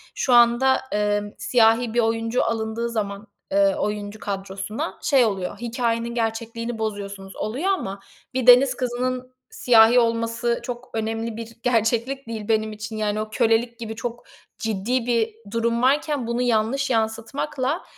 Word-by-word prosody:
şu 255 - +1
anda, 240 +2 +5
eee, 205 0 0
siyahi 225 +2 +3
bir 240 - +2
oyuncu 225 +1 +1
alındığı 225 +1 -2
zaman, 205 -2 -4 0.2
eee, 295 0 +3
oyuncu 210 -6 -3
kadrosuna, 195 0 -5
şey 270 -4 +4
oluyor, 195 -3 -3
"Hikâyenin 235 0 -2
gerçekliğini 230 0 -3
bozuyorsunuz." 200 -3 -5
oluyor. 270 - -2
Ama 195 - -3 0.4
bir 255 -1 -1
deniz 255 +1 +7
kızının 255 +1 -3 0.2
siyahi 235 0 +5
olması 230 0 0
çok 245 0 -6
önemli 225 0 -3
bir 230 0 -8
gerçeklik 235 +3 0
değil 220 -2 -5
benim 215 -1 +1
için, 220 +1 -7
yani, 215 0 -1
o 215 - -5
kölelik 235 +1 +1
gibi 225 -1 -5
çok 240 +1 -5 0.4
ciddi 225 +3 -1
bir 230 -2 +1 0.2
durum 230 +1 0
varken 285 -1 +1
bunu 235 +1 -1
yanlış 245 +4 +1
yansıtmakla, 255 +6 -1
230 Hz, 140 wpm, -23 LUFS, 220-245 Hz, 0.4 s, deniz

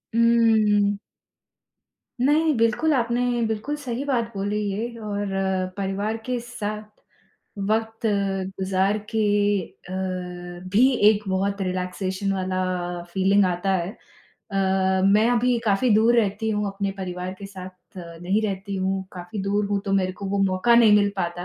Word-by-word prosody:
उम्म। 220 -3 +4 1.3
नहीं, 310 +1 +3
बिल्कुल 230 +8 +2
आपने 240 -1 +1 0.3
बिल्कुल 220 +7 -3
सही 260 -2 -4
बात 235 -5 0
बोली 205 +2 -1
ये 220 +4 -2
और 205 -1 -3 0.5
परिवार 200 +3 -2
के 250 -1 -1
साथ 215 -3 -5 0.9
वक़्त 225 +1 -1
गुज़ार 195 -1 0
के 220 - -1 0.7
अ, 185 - -5 0.8
भी 245 +8 +4 0.2
एक 210 -1 +1
बहुत 200 +1 -1
रिलैक्सेशन 185 +1 -2
वाला 185 -1 -1 0.5
फीलिंग 195 +1 +3
आता 180 +2 0
है। 180 +2 -2
अ, - - -23 0.9
मैं 210 +3 +4
अभी 245 0 +2
काफ़ी 220 +3 +2
दूर 230 +3 +4
रहती 220 0 +1
हूँ 210 -1 -1
अपने 195 0 -2
परिवार 180 0 -4
के 200 - -7
साथ 185 -1 -12
नहीं 175 +4 -2
रहती 200 -1 -3
हूँ, 190 0 -1
काफ़ी 180 +3 -6
दूर 200 +1 0
हूँ, 200 -1 0
तो 195 - -2
मेरे 185 -1 +1
को 195 +1 -7
वो 200 +1 -1
मौका 190 +5 +3
नहीं 230 -3 +6
मिल 205 -1 +3
पाता। 175 -1 -3
200 Hz, 140 wpm, -24 LUFS, 190-225 Hz, 1.3 s, नहीं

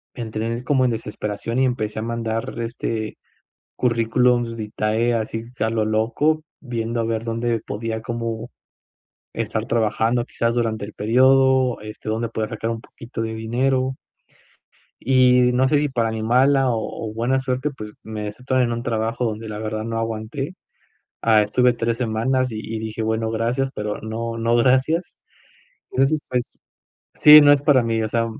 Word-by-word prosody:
entré 115 0 -3
como 130 -1 +2
en 125 - +2
desesperación 110 +1 -3
y 130 - +4
empecé 110 -4 -2
a - - -3
mandar 115 0 -3
este 115 -2 -3 0.6
currículums 120 0 +2
vitae 110 +1 -1
así 115 0 -3
que 120 - -2
a 110 - +1
lo 110 -1 0
loco, 120 +9 +1 0.2
viendo 115 -3 -3
a - - 0
ver 115 0 -2
dónde 115 0 -1
podía 110 +1 -4
como 115 -1 -4 0.8
estar - - -2
trabajando, 115 +1 +1
quizás 115 -1 -1
durante 110 -3 -1
el 105 - -11
período 130 +3 +4
este, 105 0 -10
dónde 115 +1 -1
podía 110 -1 -2
sacar 115 +1 -4
un 115 -1 -3
poquito 115 -1 -8
de 110 0 -3
dinero. 130 +4 0 1.1
Y 125 -1 +4
no 130 +2 +3
sé 145 +2 +3
si 145 0 +1
para 115 -4 0
animarla 130 +5 +3
o- 115 -1 -3
o - - -10
buena 125 +4 +1
suerte, 130 +2 -1
pues 105 -7 -9
me 105 -1 -5
aceptaron 125 +4 0
en 120 - -1
un 115 0 -3
trabajo 115 +1 -1
donde 110 0 -3
la 105 -1 -5
verdad 110 0 -3
no 115 0 -3
aguanté. 115 +9 -4 0.6
Ah, 110 -2 +4
estuve 125 +4 +3
3 115 -1 -2
semanas 125 +2 0
y- 110 - -4
y 110 0 -5
dije: 110 0 -4
"Bueno, 110 0 -1
gracias, 120 +4 -1
pero 105 0 -3
no- 115 +1 -4
no 115 +1 +1
gracias". 130 +8 +2 0.7
Entonces, 135 +4 +2
pues, 125 -1 -1 0.7
sí, 150 0 +9
no 145 0 +7
es 145 - +4
para 140 -3 +4
mí, 115 -1 0
o 110 - -1
sea, 115 +1 0
115 Hz, 165 wpm, -22 LUFS, 110-125 Hz, 1.1 s, sí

